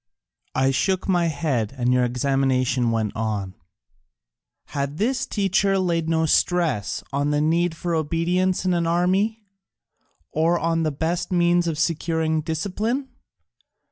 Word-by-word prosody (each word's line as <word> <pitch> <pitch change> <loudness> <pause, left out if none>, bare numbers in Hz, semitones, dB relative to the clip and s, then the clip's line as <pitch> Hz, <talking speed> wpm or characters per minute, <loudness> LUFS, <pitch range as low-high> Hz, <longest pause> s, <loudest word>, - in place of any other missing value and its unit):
I 135 +1 +3
shook 185 +8 0
my 175 -3 +2
head 140 -7 -1
and 125 0 +1
your 125 0 +3
examination 130 -1 +1
went 110 -2 -1
on: 105 -4 -2 1.2
Had 140 +1 -3
this 255 +6 0
teacher 195 -1 +1
laid 170 -3 0
no 160 0 +2
stress 155 - +1
on 145 +1 0
the 150 0 +1
need 165 +2 +1
for 175 0 -2
obedience 175 +4 0
in 185 - +2
an 170 -1 0
army, 190 +6 +1 0.9
or 165 +3 +2
on 165 0 0
the 155 -1 0
best 165 +6 -2
means 175 -1 +3
of 160 -2 -2
securing 160 -1 0
discipline? 205 - -2
165 Hz, 135 wpm, -23 LUFS, 140-180 Hz, 1.2 s, I